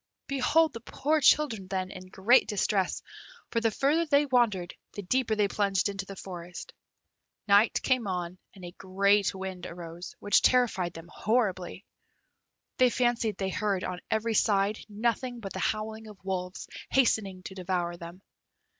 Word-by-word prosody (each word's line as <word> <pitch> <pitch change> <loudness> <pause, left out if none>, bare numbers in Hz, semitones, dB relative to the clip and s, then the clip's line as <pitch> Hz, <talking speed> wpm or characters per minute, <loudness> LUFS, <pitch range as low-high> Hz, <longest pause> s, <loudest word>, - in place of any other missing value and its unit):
Behold 280 +4 +2
the 230 - -6
poor 295 +6 0
children 265 -9 +3
then, 185 0 -3
in 185 -1 -10
great 195 +7 +4
distress, 200 -2 0 0.5
for 230 - 0
the 225 - +3
further 295 +9 +1
they 290 0 +4
wandered 230 -10 +1 0.2
the 205 - -6
deeper 230 +3 +1
they 210 -1 +2
plunged 200 -1 +1
into 195 -1 -5
the 195 - -8
forest. 175 -2 -8 0.7
Night 205 +3 +5
came 255 -5 +1
on, 180 -1 -3 0.2
and 185 -2 -10
a 175 - -7
great 200 +1 +2
wind 190 -2 -6
arose, 170 0 -9
which 205 - +3
terrified 215 -9 +2
them 165 0 -10
horribly. 195 -2 -1 0.9
They 255 -1 +5
fancied 240 -3 0
they 190 -1 -2
heard 195 -1 -1
on 180 - -4
every 225 +1 0
side 205 0 +2
nothing 235 +3 -1
but 195 -4 -7
the - - -4
howling 220 +1 -2
of 210 -2 -12
wolves, 180 -1 -4 0.2
hastening 205 -8 +1
to 190 - -8
devour 180 -2 -2
them. 170 +2 -11
200 Hz, 155 wpm, -28 LUFS, 185-235 Hz, 0.9 s, Night